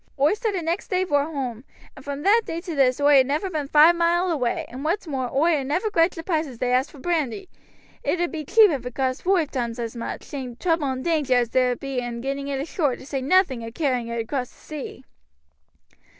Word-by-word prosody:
Oi 285 +6 +4
started 420 -6 -2
next 335 +4 -2
day 370 -1 +1
vor 290 -6 +1
hoam, 260 -7 -4 0.3
and 270 - -12
from 285 +1 -5
that 430 +4 +5
day 330 - -4
to 340 -1 -6
this 265 -3 +2
oi 285 -1 +6
ha' - - +2
never 300 +8 -2
been 300 -4 -2
five 310 +4 +6
mile 345 +1 +2
away, 250 -7 -1
and 260 +3 -8
what's 355 +6 -1
more, 265 -5 -3
oi 310 +2 +2
ha' - - -3
never 355 +11 -1
grudged 330 -1 +3
the 330 - -6
price 320 -3 0
as 255 -4 -10
they 250 +1 -1
asked 255 +3 +2
for - - -15
brandy. 325 - -2 0.6
It 350 - 0
ud 350 0 0
be 315 -2 -4
cheap 425 +6 +5
if 275 -5 -3
it 250 -1 -7
cost 260 -1 -1
voive 360 -5 +1
toimes 235 -3 -3
as 235 -1 -4
much, 235 - -5
seeing 260 -4 -6
the - - -17
trouble 330 0 0
and 260 0 -3
danger 300 -6 +2
as 240 -2 +1
there 255 -1 +2
be 270 0 -4
in 240 -1 -4
getting 275 +2 -3
it 275 -1 -2
ashore, 285 -2 -1
to - - -13
say 275 -1 -3
nothing 275 -4 +2
o' 230 - -6
carrying 250 -3 -1
it 235 0 -4
across 250 +2 -3
the - - -23
sea." 290 -3 -8
285 Hz, 240 wpm, -24 LUFS, 255-335 Hz, 0.6 s, oi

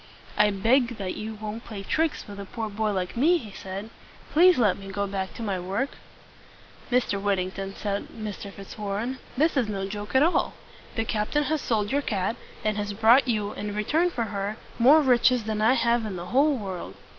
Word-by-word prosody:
"I 210 - +5
beg 230 +4 +2
that 190 -3 -3
you 220 +1 -5
won't 215 +1 -6
play 205 -4 -7
tricks 320 +9 0
with 200 -1 -9
a 200 - -5
poor 220 +1 -5
boy 215 +1 0
like 185 -2 -2
me," 320 +9 +4
he 220 -10 -8
said. 195 +3 -7 0.4
"Please 355 +3 +6
let 210 -6 +3
me 195 - -9
go 200 +1 -1
back 195 -1 -4
to 230 - -6
my 195 -4 -1
work." 195 +10 -2 1.0
"Mr. 240 -5 +1
Whittington," 195 0 -1
said 200 -1 -3
Mr. 210 -2 -7
Fitzwarren, 210 +5 -4 0.2
"this 315 +4 +3
is 255 -5 +2
no 195 -2 -3
joke 205 +4 -6
at 260 - +6
all. 335 - +2 0.4
The 225 - 0
captain 220 +8 0
has 305 0 0
sold 210 -3 0
your 285 +1 +2
cat, 205 -3 -1 0.3
and 215 0 +1
has 205 0 -2
brought 230 +6 +5
you, 210 -3 0
in 205 0 -5
return 310 +12 +2
for 245 -8 -2
her, 205 0 -3 0.2
more 290 +6 +7
riches 250 -2 +4
than 215 0 -2
I 225 +4 +5
have 235 -2 +2
in 210 -3 -4
the 175 -1 -5
whole 285 +2 +4
world." 190 -5 -6
215 Hz, 200 wpm, -26 LUFS, 200-250 Hz, 1.0 s, more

